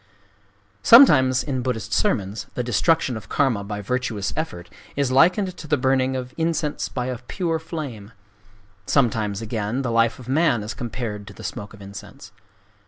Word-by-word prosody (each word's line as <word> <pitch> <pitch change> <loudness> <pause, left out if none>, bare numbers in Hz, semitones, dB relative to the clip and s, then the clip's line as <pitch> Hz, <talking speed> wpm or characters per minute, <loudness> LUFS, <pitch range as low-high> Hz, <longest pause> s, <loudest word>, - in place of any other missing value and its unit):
Sometimes 130 - +7
in 130 -3 -2
Buddhist 120 -4 -3
sermons 100 +1 0
the 125 - -1
destruction 130 +2 +1
of 105 -2 -9
Karma 125 -8 +1
by 105 0 -5
virtuous 110 -4 -2
effort 90 - -4 0.3
is 140 -2 0
likened 180 +7 +3
to 155 - -9
the 150 0 +2
burning 130 0 +1
of 125 -1 -5
incense 160 -2 -1
by 125 -2 -3
a 125 -2 -4
pure 165 +5 -2
flame,—sometimes, 105 - -4
again, 110 +3 -2
the 125 - -1
life 115 0 +2
of 125 - -12
man 140 -5 +2
is 105 - -5
compared 110 -4 -5
to - - -10
the - - -12
smoke 105 +1 -6
of 100 - -13
incense. 100 0 -11
125 Hz, 160 wpm, -23 LUFS, 105-140 Hz, 0.3 s, Sometimes